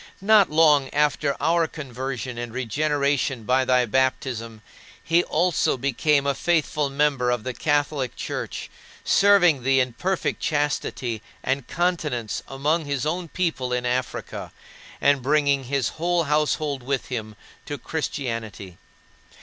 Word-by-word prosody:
Not 210 -1 +6
long 150 -3 +4
after 145 -1 +1
our 165 +2 +2
conversion 130 -4 -5
and 120 -1 -5
regeneration 140 +1 0
by 130 +3 +2
thy 125 -1 +3
baptism, 120 -3 -1 0.4
he 170 +1 +3
also 170 -3 +1
became 140 +2 +1
a 140 - +2
faithful 150 -3 0
member 140 -3 +1
of 120 -3 0
the 130 - -3
Catholic 145 -1 0
Church, - - -5 0.4
serving 190 -8 +5
thee 135 +1 +3
in 125 -2 0
perfect 185 +8 -1
chastity 140 -6 -1 0.2
and 135 0 -1
continence 155 - -1
among 150 +4 0
his 140 -1 -2
own 170 +3 -2
people 160 -6 -2
in 125 0 -1
Africa, 125 0 -3 0.5
and 140 -1 +3
bringing 140 0 +2
his 135 -1 0
whole 175 +1 0
household 150 -2 0
with 135 +1 -3
him 110 -4 -5 0.3
to 145 - -4
Christianity. 115 - -5
140 Hz, 130 wpm, -24 LUFS, 125-155 Hz, 0.5 s, Not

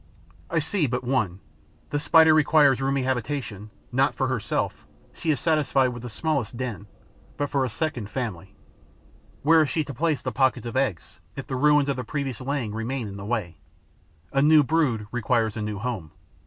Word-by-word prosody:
I 165 - -1
see 160 +1 +1
but 125 +1 -2
one: 110 -8 -1 0.5
the 145 - 0
Spider 160 +1 +6
requires 150 -3 +4
a - - 0
roomy 135 -1 +1
habitation, 120 -5 -3 0.2
not 135 +3 +2
for 130 -1 0
herself 125 -5 -2 0.3
she 165 - -4
is 150 - +2
satisfied 150 -5 +2
with 120 -1 -7
the 125 - -6
smallest 135 -3 -2
den 115 -5 -5 0.5
but 145 -1 -2
for 140 -1 +1
a 130 - -1
second 120 -4 -3
family. 100 -5 -5 0.9
Where 160 +2 +6
is 150 - +1
she 160 - 0
to 140 - -7
place 155 +2 0
the - - -2
pockets 130 -2 +1
of 115 - -5
eggs, 130 -10 -2 0.2
if 135 - -6
the 130 - -4
ruins 150 +1 +4
of 140 -2 -1
the 125 - -3
previous 135 0 -4
laying 130 -5 -2
remain 115 +2 -3
in 100 0 -8
the 100 - -7
way? 100 -8 -3 0.8
A 135 - +3
new 150 +1 +6
brood 135 -8 +1
requires 115 -2 0
a 110 - -4
new 105 -1 -3
home. 105 -7 -4
130 Hz, 190 wpm, -25 LUFS, 115-145 Hz, 0.9 s, Spider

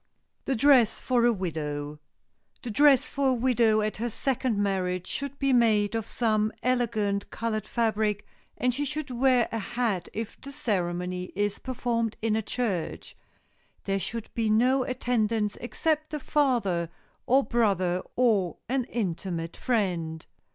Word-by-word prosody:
[Sidenote: - - -48
THE 270 - 0
DRESS 250 -5 +5
FOR 245 -2 +2
A 240 - +5
WIDOW] 150 -5 -4 0.6
The 240 - -4
dress 280 +2 +5
for 275 -1 0
a - - +3
widow 235 -3 +3
at 215 0 -2
her 235 +2 -2
second 255 -1 -1
marriage 185 -3 0
should 280 0 -4
be 275 -1 +1
made 215 -4 +3
of 225 -1 -2
some 215 -2 +1
elegant 220 -5 0
colored 220 -2 -3
fabric 215 -3 0 0.3
and 250 0 +1
she 285 +4 -1
should 295 -1 -4
wear 250 -1 +3
a 225 - -2
hat 210 -4 -2
if 220 0 -6
the 275 - -8
ceremony 180 -8 -2
is 205 0 -1
performed 235 -3 -2
in 220 -1 0
a 220 - +1
church. 200 -7 -3 0.7
There 195 0 0
should 225 +4 -5
be 225 -2 0
no 250 +5 +4
attendants 230 -4 0
except 310 +5 -1
the 300 - -4
father 235 - +1 0.4
or 265 +2 +5
brother 190 -7 +1
or 215 -8 +2
an 255 0 0
intimate 175 -6 -3
friend. 175 -9 -1
225 Hz, 150 wpm, -27 LUFS, 195-250 Hz, 0.7 s, DRESS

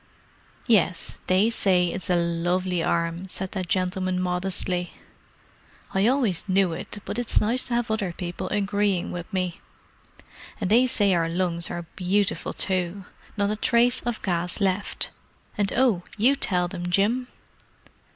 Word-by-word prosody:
"Yes, 185 -7 +2
they 195 +5 +3
say 180 -5 +3
it's 185 0 -3
a 180 - +3
lovely 175 +1 0
arm," 170 +2 -1
said 190 0 -5
that 185 -3 -4
gentleman 185 0 0
modestly. 180 0 0 1.0
"I 195 +3 +3
always 240 - +1
knew 190 -2 +3
it, 185 - -7
but 235 - -3
it's 245 - +2
nice 235 +4 +1
to 240 - -1
have 240 -1 -1
other 205 -5 -1
people 175 +1 -5
agreeing 200 -2 0
with 175 +3 -7
me! 185 -3 -2 1.0
And 200 -3 -2
they 245 +3 +5
say 205 -6 +3
our 165 -1 +1
lungs 170 -1 -1
are 175 -1 -5
beautiful 195 +2 0
too; 185 0 -1 0.3
not 200 0 +1
a - - 0
trace 240 +3 +2
of 240 -2 -4
gas 175 0 -1
left. 195 0 -1 0.4
And—oh, 210 0 +2 0.2
you 250 +7 +4
tell 180 -9 +2
them, 175 0 -5
Jim!" 220 +8 +1
190 Hz, 145 wpm, -25 LUFS, 180-210 Hz, 1.0 s, they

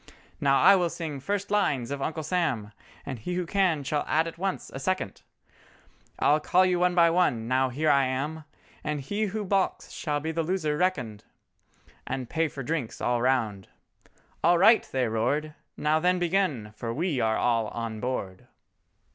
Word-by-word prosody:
Now 135 -1 +3
I 195 +1 +7
will 175 -2 +1
sing 160 -4 -5
'first 200 +8 -3
lines' 140 - +1
of 140 -1 -3
'Uncle 160 +2 -3
Sam,' 150 - -1 0.3
And 130 -4 -5
he 175 +11 -4
who 180 -1 -1
can 180 -5 +1
shall 145 +2 -1
add 160 +1 +2
at 165 0 -7
once 195 0 -3
a 135 - -5
second, 160 - -2 1.0
I'll 150 +1 +3
call 180 +4 +3
you 180 -1 +1
one 180 0 +2
by 170 -1 +5
one—now 130 -6 +1
here 150 +5 +1
I 140 -1 +4
am, 145 +5 -3 0.4
And 150 -1 -2
he 205 +10 -2
who 210 +2 -4
balks 195 0 0
shall 150 -3 -2
be 160 +2 -3
the 165 +1 -1
loser 160 -3 -1
reckoned, 130 - -1 0.8
And 130 -2 -4
pay 165 0 +1
for 135 -2 -7
drinks 145 -4 -3
all 120 -1 0
round"— 115 -7 0 0.8
"All 175 +1 +5
right," 220 +6 +5
they 130 -2 +1
roared, 135 +8 -1 0.2
"Now 155 +1 +2
then 180 +2 +2
begin, 170 - 0
for 115 +2 -4
we 155 +2 -1
are 110 0 +1
all 115 -2 +1
on 115 -1 -5
board!" 105 -7 -4
150 Hz, 175 wpm, -27 LUFS, 125-180 Hz, 1.0 s, I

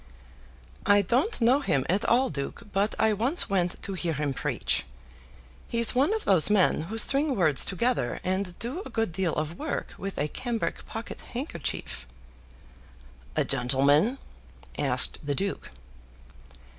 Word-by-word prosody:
"I 205 0 +5
don't 260 - 0
know 245 +4 +4
him 140 - 0
at 195 +4 +1
all, 255 +3 +3
duke, 140 -2 -5
but 200 +2 0
I 220 -1 +3
once 240 - +3
went 180 -2 0
to 195 - -4
hear 175 -3 -1
him 145 -1 -2
preach. - - -1 0.8
He's 235 -1 +2
one 270 +8 +2
of 440 - -5
those 185 -2 +4
men 205 -6 +3
who 220 - -4
string 275 +5 +3
words 155 -8 +3
together, 195 - 0
and 185 -1 -2
do 260 +11 -4
a - - -9
good 225 -5 -1
deal 175 -1 -1
of 155 +3 -3
work - - -4
with 195 0 -5
a 150 - 0
cambric 235 - -3
pocket 225 +1 -7
handkerchief." 240 - -5 1.3
"A - - +2
gentleman?" 145 - +3 0.6
asked - - +1
the 145 -1 -2
duke. 195 +6 -3
200 Hz, 145 wpm, -27 LUFS, 165-240 Hz, 1.3 s, I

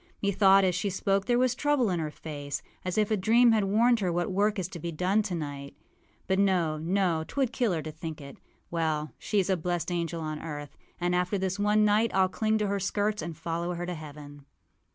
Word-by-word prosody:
Methought 195 -1 +4
as 185 -1 +2
she 185 +3 -1
spoke 195 +1 0
there 240 -1 +2
was 250 -1 +3
trouble 265 -5 +1
in 175 - 0
her 155 -1 -2
face, 145 -2 -6 0.2
as 185 +1 -3
if 215 0 +2
a - - +4
dream 230 +5 +4
had 215 -3 +2
warned 230 +4 +3
her 185 -4 0
what 175 +3 -1
work 205 +3 +1
is 185 -3 -2
to 175 - -8
be 170 +2 -4
done 185 +6 +1
tonight. 145 -8 -5 0.5
But 190 0 +1
no, 175 -6 +2
no; 170 -1 +1
âtwould 265 +7 -1
kill 240 -5 +1
her 160 -2 -2
to 155 - -6
think 160 0 -7
it. 140 -1 -10 0.3
Well, 155 -2 -1
sheâs 200 -4 +1
a 190 - +2
blessed 175 0 -2
angel 170 -1 -2
on 155 -1 -4
earth; 145 -2 -7 0.2
and 175 0 0
after 180 +3 +1
this 190 0 -2
one 210 +1 +3
night 210 +2 +3
Iâll 190 -1 +3
cling 220 +1 +1
to 210 -1 0
her 200 0 -1
skirts 205 +2 -1
and 160 -1 -6
follow 170 +1 -3
her 175 +1 -4
to 180 - -3
heaven. 145 -2 -10
185 Hz, 220 wpm, -28 LUFS, 160-205 Hz, 0.5 s, Methought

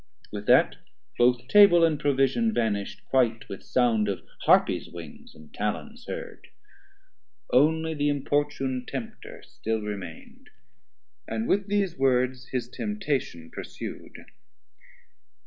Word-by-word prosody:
With 105 0 -6
that - - +5 0.4
Both 125 0 +3
Table 200 -1 +7
and 155 -3 0
Provision 145 - +1
vanish'd 105 -3 -2
quite 120 -4 +1
With 95 - -8
sound 115 -4 +1
of 100 - -3 0.2
Harpies - - +3
wings, 85 -3 -11
and 75 -1 -16
Talons - - -4
heard; - - -7 1.1
Only 160 +4 +3
the 145 -1 0
importune 140 -2 -1
Tempter 130 -4 -7
still 110 -1 -3
remain'd, 100 -6 -8 0.8
And 110 0 -3
with 200 +1 +1
these 195 -6 0
words 130 -1 +1
his 125 -2 -3
temptation 140 - -3
pursu'd. - - -8
130 Hz, 115 wpm, -26 LUFS, 110-145 Hz, 1.1 s, Table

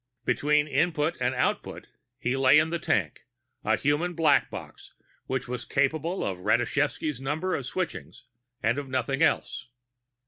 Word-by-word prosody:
Between 150 0 +2
Input 160 +1 +1
and 125 +1 +1
Output, 125 - -1 0.3
he 130 -1 -1
lay 135 +1 +5
in 155 +1 +3
the 170 - -1
tank, 95 - -1 0.4
a - - +3
human 160 +5 0
Black 155 -3 +3
Box - - -10 0.3
which 130 -1 -2
was 125 -1 -4
capable 155 +9 0
of 95 -2 -3
Rashevsky's 125 - 0
Number 155 +7 -1
of 135 - -2
switchings, 180 -4 -5 0.4
and 115 +5 +2
of 140 -2 -7
nothing 135 +2 -1
else. 140 -5 +1
145 Hz, 145 wpm, -27 LUFS, 125-155 Hz, 0.4 s, lay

